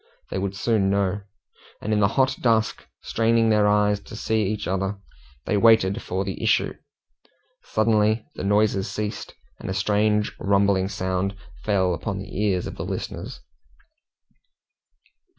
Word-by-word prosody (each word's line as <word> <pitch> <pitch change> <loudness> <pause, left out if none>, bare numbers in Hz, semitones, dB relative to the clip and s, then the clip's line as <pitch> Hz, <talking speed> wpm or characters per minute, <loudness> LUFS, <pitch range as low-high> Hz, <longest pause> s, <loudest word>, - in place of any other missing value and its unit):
They - - -1
would 100 0 -3
soon 100 -2 +1
know; 100 0 0 0.6
and 110 - -2
in 105 - +2
the 100 - +4
hot 130 0 +3
dusk, 115 -2 +1 0.2
straining 115 0 +2
their 105 -1 +4
eyes 105 0 +3
to 100 +2 -11
see 110 0 0
each 105 +1 -2
other, 95 +2 -1 0.5
they 105 - +1
waited 110 -1 +4
for 95 +2 -3
the - - -5
issue - - +2 0.9
Suddenly 110 0 +1
the - - -6
noises 105 -1 +2
ceased, 105 0 -5 0.2
and - - -6
a 95 - -2
strange 105 +1 +1
rumbling 100 -1 +2
sound 95 0 -2 0.3
fell 95 -2 +1
upon 100 +3 -3
the 100 0 -8
ears 95 -4 +1
of - - -7
the - - -4
listeners. - - -5
105 Hz, 145 wpm, -24 LUFS, 95-110 Hz, 0.9 s, the